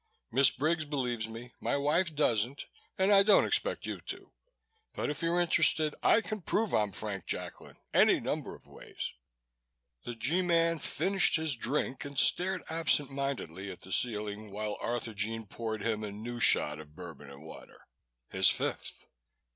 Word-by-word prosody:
"Miss 135 +3 +6
Briggs 155 +3 0
believes 125 -6 -2
me, 115 +2 -9
my 115 +5 0
wife 155 +4 +1
doesn't, 125 -2 +1 0.3
and 190 +2 +3
I 200 -1 +9
don't 205 0 +5
expect - - 0
you - - -5
to. - - -7 0.6
But - - -1
if 150 - -5
you're 170 +1 +1
interested, 160 -3 +3
I 230 - +5
can 215 -2 -5
prove 215 +4 0
I'm 105 -2 +2
Frank 100 -3 -5
Jacklin - - -6 0.2
any - - +5
number - - -3
of - - -19
ways." - - -7 0.9
The 120 - -5
G 145 +11 0
Man 165 -2 +2
finished 195 +4 +2
his 160 -3 +2
drink 130 +2 -2
and 140 -1 -8
stared 185 +4 +3
absent 160 -4 +1
mindedly 135 - -4
at 90 - -9
the 95 - -12
ceiling, 105 -1 -2
while 105 +1 -4
Arthurjean 115 -1 -3
poured 110 +1 -5
him 110 -2 -1
a 105 - -4
new 120 +4 -6
shot 75 -9 +3
of 75 -1 -13
Bourbon 80 -5 -10
and 70 +2 -12
water 80 - -13 0.5
his - - +4
fifth. - - -2
125 Hz, 165 wpm, -31 LUFS, 105-160 Hz, 0.9 s, I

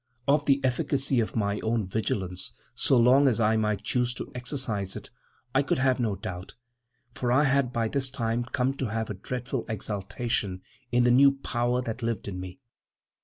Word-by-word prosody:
Of 145 +1 +3
the 140 -1 +4
efficacy 130 +1 +1
of 110 - -1
my 100 -2 0
own 110 -1 0
vigilance, 95 -2 -2 0.2
so 130 - +3
long 130 +4 +6
as 120 -3 +2
I 110 0 +3
might 105 -1 0
choose 125 +2 0
to - - -7
exercise 125 -6 -2
it, - - -8 0.4
I 135 - +4
could 140 - 0
have 130 0 +2
no 110 -5 0
doubt, 95 -1 -7 0.6
for 125 -1 -1
I 130 +4 +4
had 135 -3 +2
by 115 -2 0
this 130 +2 +2
time 120 -2 -1
come 125 +2 0
to 130 - -1
have 110 +1 -3
a - - -2
dreadful 125 +5 -4
exultation 105 -2 -2 0.3
in 120 0 +3
the 120 - +4
new 140 +3 +6
power 125 -2 -1
that 115 +1 -5
lived 115 -4 -2
in 95 -2 -5
me. 90 +3 -7
120 Hz, 185 wpm, -27 LUFS, 105-130 Hz, 0.6 s, long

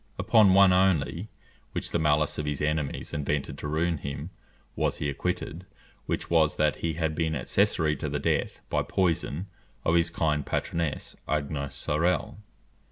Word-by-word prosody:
Upon 105 -5 +5
one 95 -1 +7
only, 90 +1 +2 0.4
which - - -3
the 85 - +1
malice 75 -1 +2
of 75 - -2
his 75 -1 -1
enemies 75 -2 -2
invented 75 -1 -1
to - - -4
ruin 80 +1 0
him, 70 +5 -5 0.4
was - - 0
he 75 - -1
acquitted; 85 +5 -3 0.4
which - - -2
was, 80 -2 +3
that 75 -1 +2
he 80 -1 -2
had 80 0 -1
been 80 0 0
accessory 75 +3 +2
to - - -3
the - - -1
death, - - -1
by - - +1
poison, 85 -2 0 0.4
of 80 - +3
his 85 0 +3
kind 75 -3 0
patroness, 85 +1 -2
Agnes 70 -2 -2
Sorel. 85 +6 0
80 Hz, 160 wpm, -27 LUFS, 75-85 Hz, 0.4 s, one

